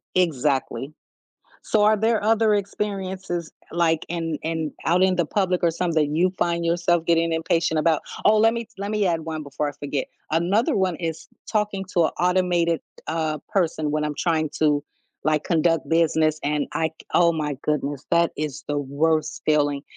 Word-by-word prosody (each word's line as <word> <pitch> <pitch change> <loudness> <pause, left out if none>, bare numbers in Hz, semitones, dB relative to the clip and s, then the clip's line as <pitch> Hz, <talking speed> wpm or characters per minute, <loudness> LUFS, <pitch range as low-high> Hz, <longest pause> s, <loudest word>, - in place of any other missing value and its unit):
Exactly. 140 -5 0 0.7
So 215 -1 +1
are 215 +1 +5
there 220 0 +1
other 220 0 +3
experiences 190 -4 -3 0.2
like 165 -2 +1
in 165 -3 -3
in 160 -1 -2
out 175 +3 +3
in 185 -1 +3
the 175 -2 +1
public 185 0 0
or 170 - +4
something 160 -3 0
you 180 +2 +3
find 170 0 0
yourself 170 0 +1
getting 165 0 +2
impatient 160 0 +1
about? 155 -1 +2 0.2
Oh, 215 +1 +5
let 225 +1 +4
me 235 -1 -4
let 200 +1 -3
me 210 -2 +1
add 165 -2 +1
one 160 -1 -5
before 145 +1 -3
I - - -5
forget. 145 -1 -3 0.2
Another 195 - +2
one 190 -4 +1
is 165 -2 -5 0.2
talking 210 -2 0
to 170 -3 +3
a - - 0
automated, 175 -2 +2 0.3
uh, 155 -1 -1
person 160 -5 0
when 150 0 0
I'm 150 -1 -2
trying 160 -3 +1
to, 150 -2 +3 0.4
like, 155 0 +2
conduct 165 0 +1
business 160 -1 +2
and 150 0 0
I 160 -1 -1 0.2
oh 170 -1 +5
my 150 -4 -3
goodness, 145 -2 -2
that 170 0 +3
is 150 -1 -4
the 145 0 0
worst 150 +3 0
feeling. 145 -2 +2
165 Hz, 170 wpm, -23 LUFS, 155-185 Hz, 0.7 s, are